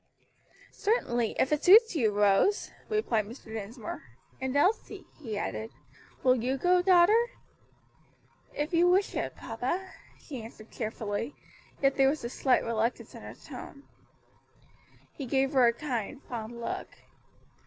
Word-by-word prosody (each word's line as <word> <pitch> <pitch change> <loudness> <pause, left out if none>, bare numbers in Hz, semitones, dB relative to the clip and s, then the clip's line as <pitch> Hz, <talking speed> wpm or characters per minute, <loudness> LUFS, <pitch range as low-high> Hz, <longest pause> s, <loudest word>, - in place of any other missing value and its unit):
"Certainly, 240 - 0
if 265 - +2
it 300 - 0
suits 440 +2 +7
you, 235 -8 +3
Rose," 205 - +2 0.2
replied 250 - +1
Mr. 225 -1 -11
Dinsmore; 220 +1 -6 0.4
"and 260 +1 -2
Elsie;" 380 +10 +1 0.2
he 220 -7 -4
added, 220 +1 -3 0.5
"will 255 - +6
you 255 +2 -1
go, 360 +5 +3
daughter?" 385 +6 +5 1.2
"If 300 +4 -3
you 345 +1 +5
wish 380 +2 +2
it, - - -3
papa," 265 +12 -4 0.3
she 265 -6 -8
answered 220 0 -12
cheerfully; 220 +2 -4 0.5
yet 275 0 +3
there 270 -1 +5
was 295 -1 -2
a 235 - -3
slight 260 0 +2
reluctance 230 +1 -2
in - - -10
her - - -9
tone. 280 -3 -10 1.3
He 275 - -6
gave 270 +3 +1
her 255 -3 +6
a - - +5
kind, 255 -1 -4
fond 235 0 -6
look. 230 - -4
260 Hz, 140 wpm, -29 LUFS, 225-345 Hz, 1.3 s, suits